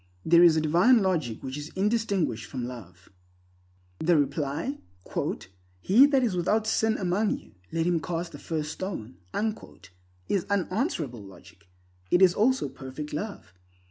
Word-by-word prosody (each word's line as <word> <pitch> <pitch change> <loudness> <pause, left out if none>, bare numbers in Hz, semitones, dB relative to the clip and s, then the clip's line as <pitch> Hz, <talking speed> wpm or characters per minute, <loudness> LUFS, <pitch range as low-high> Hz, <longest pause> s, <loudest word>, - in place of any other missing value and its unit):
There 170 +1 +6
is 170 -2 +7
a - - +2
divine 180 +10 +4
logic 160 - -1
which 130 +2 -5
is 150 +1 -7
indistinguished 195 - 0
from 125 0 -4
love. 95 -8 -10 0.9
The 170 0 +3
reply, 145 - -1 1.0
"He 225 - +6
that 275 -3 +2
is 220 -6 0
without 210 +5 +1
sin 220 0 +1
among 195 +3 0
you, - - -17 0.2
let 165 0 0
him 175 -1 +2
cast 170 +1 -4
the 145 - -10
first 155 -2 -3
stone," 160 - -6 1.1
is 195 -4 0
unanswerable 185 - -1
logic. 90 -3 -15 0.4
It 180 - +5
is 180 -2 +6
also 260 +7 +2
perfect 140 +2 -8
love. 195 - -6
170 Hz, 140 wpm, -27 LUFS, 135-200 Hz, 1.1 s, is